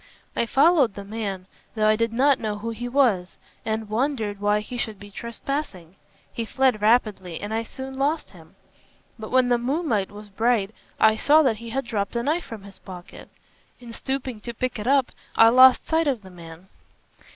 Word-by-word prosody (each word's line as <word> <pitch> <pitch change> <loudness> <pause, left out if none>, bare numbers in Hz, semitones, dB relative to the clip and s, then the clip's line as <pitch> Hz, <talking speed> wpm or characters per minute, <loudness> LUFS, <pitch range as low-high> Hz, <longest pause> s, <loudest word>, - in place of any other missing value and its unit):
"I 235 - 0
followed 275 - +4
the 200 - -7
man, 200 -3 -5 0.3
though 215 -1 +1
I 215 0 +5
did 230 +1 0
not 270 +4 +3
know 210 -1 -3
who 230 +2 -4
he 245 +2 -5
was, 235 -9 +1 0.3
and 220 0 -3
wondered 220 -3 -1
why 205 0 +2
he 230 +4 -8
should 220 -4 -4
be 205 0 -12
trespassing. 235 - -5 0.4
He 230 - -3
fled 250 -1 +1
rapidly 210 -6 +1
and 205 +2 -5
I 225 - 0
soon 265 +3 -8
lost 295 +4 -1
him. - - -17 0.6
But 215 - -7
when 255 -1 +3
the 240 -1 +3
moonlight 245 - -1
was 205 0 -12
bright 220 0 0 0.3
I 220 0 +5
saw 305 +6 +5
that 240 -6 +1
he 230 +1 -9
had 270 +3 -2
dropped 205 -2 -3
a 235 - 0
knife 315 +6 0
from 220 -4 -9
his 200 -1 -12
pocket. 180 -2 -11 0.5
In 240 -2 -11
stooping 265 -2 -4
to 235 +1 -7
pick 255 -1 -2
it 210 - -5
up 270 -1 +3 0.2
I 225 - +7
lost 255 +2 +7
sight 320 -1 +1
of 250 -7 -1
the 190 - -13
man." 170 +1 -13
230 Hz, 195 wpm, -24 LUFS, 205-260 Hz, 0.6 s, I